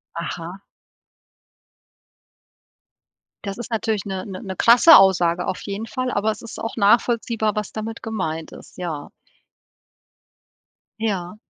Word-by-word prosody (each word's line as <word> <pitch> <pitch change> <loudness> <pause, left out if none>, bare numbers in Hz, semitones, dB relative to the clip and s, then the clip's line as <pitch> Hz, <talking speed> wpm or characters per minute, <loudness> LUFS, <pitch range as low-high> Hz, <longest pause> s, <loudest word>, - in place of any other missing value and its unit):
Aha. 170 +2 -6 2.9
Das 200 +3 -5
ist 240 - -6
natürlich 220 -2 -1
'ne 190 -2 -4
'ne 190 -3 -7
'ne 190 -1 -6
krasse 245 - +8
Aussage 180 -2 +3
auf - - -3
jeden 205 +2 -5
Fall, 255 +2 -3
aber 215 +2 +1
es 210 - -8
ist 230 - -9
auch 225 - -4
nachvollziehbar, 225 0 +2
was 210 -2 -3
damit 220 +1 -6
gemeint 175 -8 -4
ist, - - -14
ja. 160 -5 -5 1.9
Ja. 190 -4 -2
205 Hz, 120 wpm, -22 LUFS, 185-225 Hz, 2.9 s, krasse